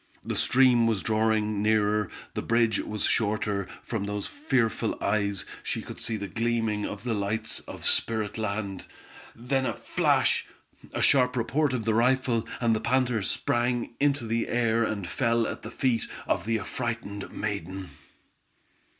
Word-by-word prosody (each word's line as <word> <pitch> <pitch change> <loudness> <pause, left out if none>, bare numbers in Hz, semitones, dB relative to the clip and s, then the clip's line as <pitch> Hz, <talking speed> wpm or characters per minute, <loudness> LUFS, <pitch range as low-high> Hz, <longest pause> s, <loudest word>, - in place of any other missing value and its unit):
The - - -2
stream 125 -3 +4
was 110 -4 0
drawing 110 -1 +1
nearer, 105 -1 +2 0.2
the - - -2
bridge 115 -1 +2
was 105 -1 -3
shorter, 105 -3 0 0.2
from 110 -4 -3
those 105 0 -3
fearful 125 - 0
eyes, 100 -1 0 0.2
she - - -2
could - - -9
see 110 -1 -1
the 100 -1 -4
gleaming 115 -2 0
of 105 +1 -7
the 120 -2 -1
lights 110 +2 -2
of - - -8
spirit 110 -2 +2
land, 100 -3 -3 0.5
then 130 +3 0
a - - -2
flash! - - +2 0.4
a - - -1
sharp 125 -2 +4
report 135 +5 +1
of 120 -4 -2
the 110 - +2
rifle, 120 -1 +2
and 115 -2 +3
the 110 - -2
panther 125 -3 +1
sprang 120 +4 0
into 140 -3 +2
the 115 +1 0
air, 115 -1 +2
and 105 -4 -2
fell 115 +2 +1
at - - -4
the 110 - -7
feet 120 -1 0 0.2
of - - -1
the 115 0 +2
affrighted 110 -2 -4
maiden! 95 -3 -4
110 Hz, 155 wpm, -27 LUFS, 105-120 Hz, 0.5 s, stream